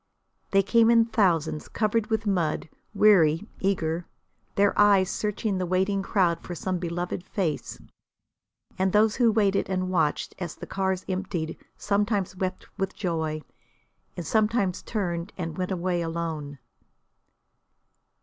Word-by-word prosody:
They 195 0 +4
came 225 +4 +4
in 230 -1 +6
thousands, 170 -9 +1
covered 215 0 0
with 220 -1 -1
mud 170 -6 0 0.3
weary, 195 -3 +5
eager, 170 -3 -1 0.5
their 200 0 +3
eyes 200 -2 +5
searching 210 -2 -1
the 185 - 0
waiting 190 +2 +1
crowd 180 -4 +1
for 175 - -7
some 185 +1 -2
beloved 175 +1 -3
face. 185 -6 -3 1.0
And 190 0 +1
those 210 0 +4
who 240 -3 +4
waited 200 -3 +2
and 185 -1 -1
watched 160 -5 0
as 175 -4 -5
the - - -8
cars 190 -1 -1
emptied 185 -4 -3 0.2
sometimes 205 -2 0
wept 185 0 -3
with 195 0 -2
joy 160 -5 -2 0.7
and 175 - -4
sometimes 210 -3 +1
turned 175 -4 -3
and 165 -4 -4
went 180 +1 -2
away 180 -1 -1
alone. 165 -3 -4
185 Hz, 130 wpm, -26 LUFS, 170-205 Hz, 1.0 s, in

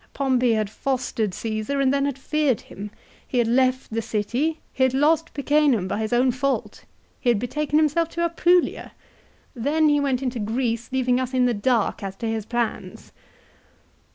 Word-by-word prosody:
" - - -40
Pompey 255 -3 +2
had 215 -1 0
fostered 245 -1 -2
Csesar; 215 +7 -3
and 275 -1 +3
then 280 0 +1
had 280 -2 -2
feared 290 -3 0
him. 205 +2 -9 0.4
He 255 - -3
had 240 - +3
left 255 0 +1
the 225 - 0
city; 240 +9 -1
he - - -5
had 260 0 +3
lost 320 +4 +2
Picenum 280 -8 +2
by 205 - -2
his 220 -1 -2
own 250 +1 +3
fault; 275 +2 -2 0.3
he 245 - 0
had 235 - +4
betaken 295 +6 -1
himself 315 +2 +2
to 340 0 -3
Apulia! 345 +1 +1 0.6
Then 300 +6 +2
he 290 0 +3
went 270 -2 0
into 250 -2 -2
Greece, 230 +2 -2
leaving 255 -1 +1
us 260 0 -3
in 250 -1 +3
the 245 - +2
dark 225 +1 0
as 195 -1 -5
to 230 - -4
his 220 -1 -3
plans 240 -2 -3
255 Hz, 180 wpm, -23 LUFS, 230-280 Hz, 0.6 s, had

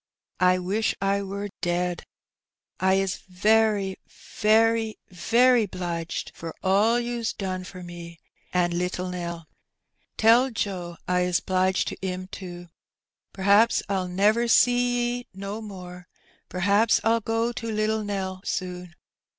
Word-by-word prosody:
I 185 0 +4
wish 195 +5 -1
I 195 +1 +1
war 200 +1 -4
ded. 175 0 -1 0.8
I 190 +1 +3
is 195 -2 0
very, 205 0 +2 0.4
very, 225 +1 +3
very 235 +5 +3
'bliged 170 -3 -4
for 165 -1 -8
ole 205 +5 +3
you's 240 -1 -2
don 185 -2 -4
for 185 0 -10
me 170 -1 -9 0.3
an' 175 -1 +1
littel 180 +1 -2
Nel; 170 -2 -5 0.7
tel 235 +4 +5
Joe 180 -7 -4
I 180 0 +2
is 180 0 +1
^bliged 185 0 +1
to - - -7
'im 185 -1 -3
to. 175 -2 -9 0.7
PVaps 200 +4 +4
PU 190 -2 -1
never, 210 +6 +3
see 245 0 +3
'e 245 - -13
no 200 +3 -5
more, 180 -4 -9 0.4
pVaps 200 +5 +3
FU 230 +1 +2
go 225 +2 0
to 230 -1 -5
littel 215 0 0
Nel 190 -2 -4
soon. 180 -2 -4
195 Hz, 130 wpm, -25 LUFS, 180-220 Hz, 0.8 s, tel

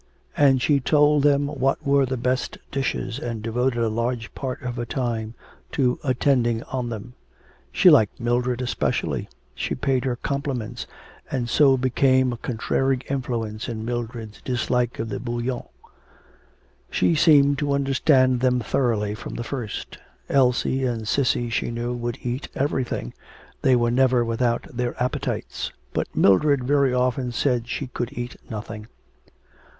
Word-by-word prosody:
And 135 -3 +4
she 145 -2 +3
told 150 +2 +4
them 145 0 +3
what 135 -2 -1
were 140 -1 +3
the 130 0 -2
best 125 +2 -1
dishes, 135 -2 -2
and 115 -6 -4
devoted 120 +1 0
a - - +2
large 115 +1 -2
part 130 -2 -4
of 125 0 -4
her 120 - -2
time 115 -3 -3 0.4
to 125 -3 +1
attending 125 -3 +1
on 125 -2 -3
them. 115 +2 -7 0.6
She 185 - +3
liked 110 -9 +4
Mildred 125 +1 0
especially; 125 - -1 0.2
she - - -3
paid 130 -2 0
her 125 -2 0
compliments 125 -3 -3 0.4
and 125 -3 -2
so 135 +2 +4
became 130 0 +2
a - - -6
contrary 130 +3 0
influence 115 -5 -3
in 110 -1 -4
Mildred's 115 -2 -5
dislike 125 -1 0
of 110 - -3
the - - -3
Bouillon. 120 +1 -3 1.2
She - - +2
seemed 145 -3 +5
to 145 -1 0
understand 135 -2 +3
them 125 0 +2
thoroughly 110 -3 0
from 105 - -7
the 120 - -3
first. 120 -4 -5 0.3
Elsie 130 0 +2
and 115 -4 -2
Cissy 120 -1 +1
she - - -1
knew 120 +1 -3
would 120 -1 -3
eat 125 +3 -3
everything, 130 - -2 0.5
they 130 - +4
were 120 -1 +2
never 125 -1 +3
without 115 +1 0
their 120 0 -2
appetites, 125 +1 -2 0.2
but - - -1
Mildred 140 +7 +4
very 140 0 +3
often 125 0 0
said 120 -1 0
she 140 - -3
could 120 -2 -4
eat 120 0 -4
nothing. 110 0 -6
125 Hz, 145 wpm, -24 LUFS, 120-135 Hz, 1.2 s, seemed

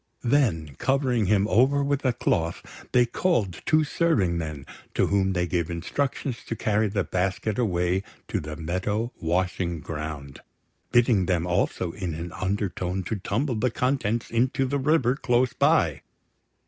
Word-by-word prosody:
Then, 110 - +1
covering 130 -5 +1
him 100 0 +3
over 130 +8 +3
with 140 0 0
a 130 - +4
cloth, 85 -7 -2
they 125 -1 +5
called 115 - 0
two 155 -2 +4
serving 145 - +1
men, 75 -4 -4 0.3
to - - +3
whom 95 -1 +1
they 90 -1 +1
gave 85 -1 -1
instructions 125 - -2
to 115 - -3
carry 110 0 +1
the 100 -1 0
basket 95 +5 -1
away 90 -4 +1 0.3
to - - -1
the 75 0 -6
meadow 95 +8 -2
washing 85 0 -1
ground, 75 -3 -6 0.5
bidding 115 -6 +4
them 90 -3 +1
also 90 -1 0
in 90 -3 -4
an 85 +2 -6
undertone 95 -1 -2
to 110 - -3
tumble 120 +8 -1
the 120 +3 +1
contents 120 -2 -1
into 125 +3 +1
the 140 +2 -1
river 135 -3 +2
close 125 -2 +1
by. - - +2
100 Hz, 150 wpm, -26 LUFS, 90-125 Hz, 0.5 s, they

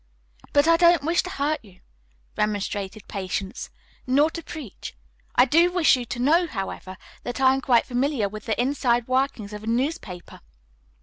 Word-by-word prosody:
"But 285 +2 +4
I 330 0 +6
don't 340 -3 +5
wish 330 +3 +2
to 365 - -7
hurt 305 -3 -1
you," 190 -4 -18 0.6
remonstrated 205 -1 -2
Patience, 195 +2 -4 0.4
"nor 285 +5 +3
to 335 - -6
preach. 300 - -9 0.4
I 250 - +6
do 335 +7 +4
wish 355 -5 +4
you 250 -1 -4
to 240 - -5
know, 320 +8 +3
however, 195 - -6 0.2
that 245 - -5
I 260 0 +5
am 270 - -1
quite 245 -3 +3
familiar 250 -3 0
with 210 +1 -9
the 220 - -1
inside 245 -2 +1
workings 255 -5 -1
of 210 0 -7
a - - -8
newspaper. 235 - -3
255 Hz, 170 wpm, -24 LUFS, 210-300 Hz, 0.6 s, I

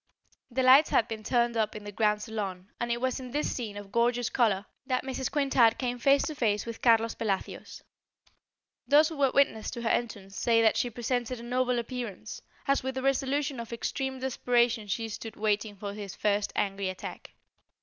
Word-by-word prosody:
The 260 +1 0
lights 265 +4 +7
had 230 - +3
been 225 -2 -5
turned 235 +1 +1
up 220 -2 0
in 210 - -7
the 205 - -7
grand 210 0 +1
salon 195 -4 -5
and 235 0 -1
it 235 - 0
was 255 +1 -1
in 255 -1 -7
this 295 +4 -1
scene 215 -5 -5
of 205 -1 -9
gorgeous 240 +1 +1
colour 210 -5 +2 0.2
that 255 -1 0
Mrs. 265 -1 -3
Quintard 270 -6 +3
came 245 -1 -2
face 275 +3 +4
to 310 - -3
face 215 -8 0
with 230 -1 -7
Carlos 230 -1 +4
Pelacios. 200 -4 -4 1.0
Those 300 +2 +6
who 320 - -7
were 275 -1 +3
witness 225 -6 +2
to 235 -1 -6
her 230 - +1
entrance 200 -4 -2
say 230 +2 +3
that 225 -1 +4
she 245 - 0
presented 245 +1 -2
a - - -9
noble 250 +1 0
appearance, 235 -3 -5 0.3
as 275 0 +3
with 265 0 -4
the 260 - -3
resolution 275 0 0
of 230 0 -7
extreme 265 +3 -3
desperation 240 -3 +1
she 225 +3 -2
stood 225 +1 -7
waiting 210 0 -1
for 200 0 -6
his 200 -2 -7
first 205 0 0
angry 195 -1 -1
attack. 185 - -8
235 Hz, 195 wpm, -29 LUFS, 215-255 Hz, 1.0 s, lights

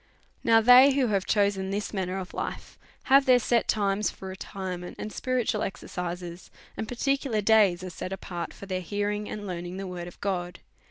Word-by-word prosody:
" - - -38
Now, 225 0 +5
they 250 +4 +8
wiio 265 -3 +1
have 195 -2 0
chosen 200 -2 +1
this 205 +2 -3
manner 190 -1 -2
of 185 -1 -6
life - - -6 0.2
have 275 0 +5
their 255 -1 +7
set 240 -1 +1
times 200 0 +1
for 190 - -9
retirement 185 -1 -6
and 210 - -6
spiritual 245 -4 -1
exer 195 - -4
cises, 175 0 -6 0.3
and 220 - -4
particular 270 -1 0
days 205 -4 +4
are 185 - -6
set 185 - -6
apart 175 -2 -5
for - - -11
their 185 -1 -3
hear 205 +4 -2
ing 210 0 -4
and 210 -1 -6
learning 175 -1 -5
the 195 - -5
word 180 -2 -6
of 175 - -12
God. 180 -3 -2
200 Hz, 200 wpm, -27 LUFS, 185-220 Hz, 0.3 s, they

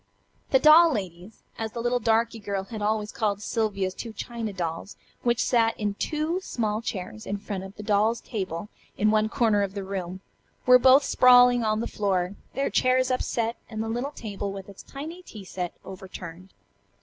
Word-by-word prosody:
The 265 - +5
"doll 315 +4 +7
ladies," 190 - -6 0.2
as 220 -1 -4
the 235 - -5
little 240 +1 +1
darky 230 0 +1
girl 200 -2 -3
had 215 +1 -7
always 210 0 0
called 205 -3 -1
Sylvia's 205 -3 -1
two 225 +3 -7
china 230 0 -5
dolls 175 0 -5 0.3
which 240 0 +1
sat 225 -2 +2
in 205 -1 -1
two 310 - -2
small 220 - -2
chairs 215 -1 -6
in 200 - -2
front 200 -2 -5
of 195 +1 -11
a 210 - -7
doll's 215 +2 +2
table 190 -4 -5 0.3
in 215 +1 +3
one 215 0 +2
corner 220 -4 +2
of 200 0 -2
the 200 - -3
room, 190 -1 -5 0.4
were 250 0 +8
both 260 +3 +6
sprawling 245 -2 +6
on 215 0 +1
the - - -2
floor, 190 -3 -1 0.2
their 275 +2 0
chairs 255 0 +2
upset, 235 -2 -1
and 220 -1 -3
the 225 - -4
little 240 +5 -2
table 205 -7 -5
with 195 0 -8
its 195 - -11
tiny 315 +6 -8
tea 215 - -11
set 180 -1 -5
overturned. 185 -1 -9
215 Hz, 185 wpm, -26 LUFS, 195-240 Hz, 0.4 s, were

